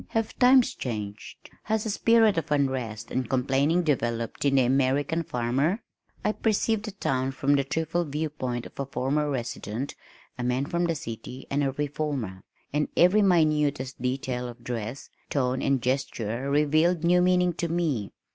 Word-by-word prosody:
"Have 225 -1 -1
times 255 0 +6
changed? 105 -4 -6
Has 220 0 0
a 220 - -1
spirit 225 0 +4
of 165 -3 -3
unrest 125 -6 -1
and 130 -3 -2
complaining 135 +6 +2
developed 120 -6 -1
in 140 -1 +3
the 135 - +5
American 135 +5 +1
farmer?" 135 - 0 0.4
I 210 - +3
perceived 215 0 0
the 215 - -4
town 135 -8 -1
from 135 +2 +1
the 140 -1 +3
triple 160 +4 -1
viewpoint 145 -5 -3
of - - -13
a 140 - -2
former 140 +3 0
resident, 120 -1 -4 0.5
a - - -2
man 125 +2 0
from 170 +3 0
the 165 -1 0
city, 125 0 -7
and 145 +1 +1
a 135 -1 0
reformer, 140 -9 -3 0.3
and 150 0 +1
every 180 +5 +6
minutest 150 -8 +2
detail 125 -1 -2
of 120 0 -10
dress, 120 +1 -5 0.2
tone 130 -2 0
and 135 -3 +1
gesture 125 -1 -1
revealed 155 +4 +3
new 180 +1 +4
meaning 180 -1 +3
to 170 +1 -2
me. 160 - -1
140 Hz, 160 wpm, -27 LUFS, 125-165 Hz, 0.5 s, times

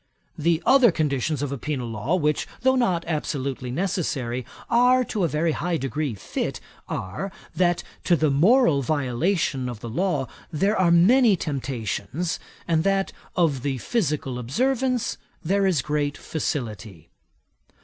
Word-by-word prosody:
The 165 +1 +1
other 260 -5 +6
conditions 150 -2 -1
of 140 - -2
a 140 - -4
penal 135 -4 -3
law, 115 +9 -1
which 150 -4 0
though 260 +1 +4
not 185 -10 +1
absolutely 140 -5 -3
necessary, 130 -6 -2 0.2
are 250 +2 +4
to 210 -5 -2
a - - +3
very 160 +2 0
high 170 +2 -1
degree 135 -1 -2
fit, 95 - -4 0.3
are, 105 - -4 0.2
that 175 -1 +2 0.2
to 175 - +4
the 155 -2 +2
moral 170 - +4
violation 140 0 0
of 120 -3 -7
the 120 - -6
law 150 0 0 0.2
there 195 +7 +1
are 185 -4 +3
many 210 +7 +6
temptations, 140 - -3 0.3
and 160 -1 +2
that 195 0 +1 0.2
of 155 -7 +2
the 135 0 -1
physical 145 - -1
observance 250 - 0 0.2
there 195 +3 +2
is 170 -8 +1
great 145 -1 -1
facility. 110 - -4
155 Hz, 140 wpm, -24 LUFS, 135-190 Hz, 0.3 s, other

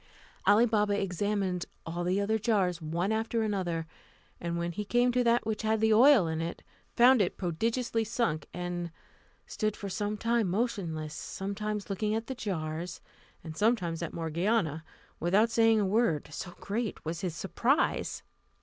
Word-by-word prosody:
Ali 225 +3 +6
Baba 210 -3 +1
examined 195 -1 -1 0.2
all 170 +1 -3
the 180 +3 +1
other 220 +2 +1
jars, 190 -6 +1
one 170 +6 -1
after 225 +1 0
another; 180 -6 -1 0.5
and 170 0 -3
when 170 0 -2
he 210 +5 -4
came 245 +4 +2
to 250 0 +2
that 235 -1 +3
which 220 -1 -2
had 220 0 +1
the 220 0 +4
oil 245 -2 +7
in 160 0 -2
it, 165 +1 -5 0.3
found 245 0 +6
it 180 - 0
prodigiously 225 +6 -1
sunk, 220 - -1
and 175 -1 -4 0.6
stood 215 -2 -2
for 200 - -5
some 210 +2 -2
time 230 -2 +1
motionless, 175 -8 -2
sometimes 205 +4 -4
looking 210 +2 -1
at 225 +1 -2
the 265 - -4
jars, 170 -6 -4 0.4
and 160 -2 -7
sometimes 185 -6 +1
at 170 - -3
Morgiana, 165 0 0 0.4
without 205 +6 +3
saying 225 -1 +4
a 205 - +2
word, 195 -6 +1
so 175 +4 -7
great 220 -2 -3
was 165 +3 -3
his 180 -4 -3
surprise. 240 - 0
200 Hz, 160 wpm, -30 LUFS, 175-225 Hz, 0.6 s, oil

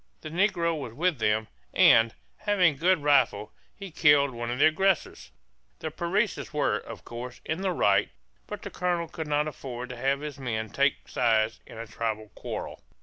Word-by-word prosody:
The 155 - -7
negro 170 -1 +1
was 125 -5 -7
with 170 -1 0
them 110 0 +1 0.3
and, 115 0 +6 0.2
having 190 -6 +3
a - - -15
good 180 -2 +3
rifle, 110 -8 +2 0.2
he 195 -3 -9
killed 145 -3 +4
one 120 -1 -5
of 120 - -2
the - - +5
aggressors. 180 +3 +1 0.5
The - - -5
Parecis - - -1
were, - - +1
of - - -11
course, 125 +1 -7
in 160 +4 -2
the 195 - 0
right, 100 - +2 0.4
but - - -7
the - - -6
colonel 175 -2 -1
could 160 -1 -6
not 150 0 +1
afford 125 -4 -6
to 125 - -7
have 135 +3 0
his 150 -2 -6
men 110 -4 -3
take 140 0 +1
sides 110 -2 +1
in - - -11
a 115 - -6
tribal 110 -1 -4
quarrel. - - -7
140 Hz, 185 wpm, -27 LUFS, 115-165 Hz, 0.5 s, and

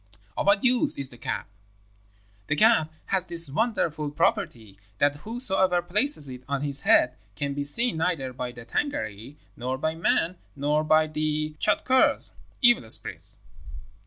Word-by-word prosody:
"'Of - - -3
what 200 0 +4
use 250 -1 +3
is 140 -2 -3
the 120 - -11
cap?' - - -4 1.0
"'The 150 - 0
cap 185 -5 +3 0.2
has 190 -2 +1
this 170 -5 +4
wonderful 160 - -1
property, 145 - -2 0.2
that 145 0 +1
whosoever 190 - +2
places 205 - +1
it 125 -1 -9
on 140 0 -2
his 140 -1 +3
head 125 0 +3 0.2
can 140 -1 -3
be 145 0 -3
seen 225 +9 +2
neither 160 -6 -2
by 125 0 -6
the 120 -1 -13
Tângâri, 115 - -4 0.2
nor 125 +2 -4
by 155 +4 -2
men, 165 +2 -1 0.2
nor 150 +2 0
by 155 0 +3
the 155 0 -3
Tschadkurrs' 255 +5 +4 0.3
(evil 240 - +4
spirits). - - -1
155 Hz, 150 wpm, -25 LUFS, 140-190 Hz, 1.0 s, what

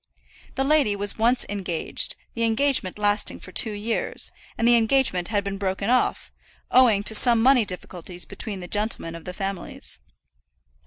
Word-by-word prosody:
The 270 - 0
lady 275 -7 +3
was 205 +1 -2
once 240 +3 +2
engaged, 190 -5 -2 0.2
the 230 - -5
engagement 230 -3 +1
lasting 205 0 0
for 185 - -9
two 215 +4 +2
years, 215 +3 -2 0.3
and 230 - +2
the 240 - +6
engagement 225 -6 +2
had 205 -2 0
been 195 -1 -4
broken 195 +2 -1
off, 255 - +1 0.4
owing 230 -6 +5
to 220 - +3
some 235 +1 +4
money 250 -1 +5
difficulties 180 -1 -6
between 200 -1 -5
the 180 - -7
gentlemen 205 -5 -1
of 165 -1 -10
the 180 - -6
families. 195 -1 -5
210 Hz, 160 wpm, -24 LUFS, 195-235 Hz, 0.4 s, the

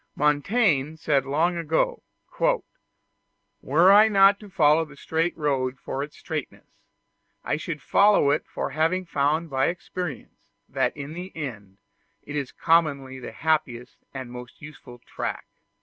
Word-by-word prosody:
Montaigne 150 - +1
said 140 -4 0
long 165 +5 +1
ago: 160 -1 0 1.6
"Were 165 +7 +4
I 210 +2 +7
not 200 -1 +5
to 210 - -12
follow 160 -4 +4
the 150 -3 -13
straight 165 +4 -1
road 135 -4 -1
for 135 - -4
its 145 +1 -7
straightness, 155 -5 -6 0.8
I 145 - -1
should 155 -2 -6
follow 200 -8 +4
it 150 - -1
for - - -4
having 165 +6 0
found 155 +1 0
by 135 0 +2
experience 180 +1 -6 0.2
that - - -1
in 145 +1 -6
the 180 +3 -7
end 105 -10 -7 0.5
it 145 - -8
is 140 -4 -3
commonly 140 -6 +1
the 125 - -8
happiest 125 -3 -2
and 130 -2 -7
most 125 0 -10
useful 145 -5 -12
track." - - -5
150 Hz, 140 wpm, -25 LUFS, 135-170 Hz, 1.6 s, I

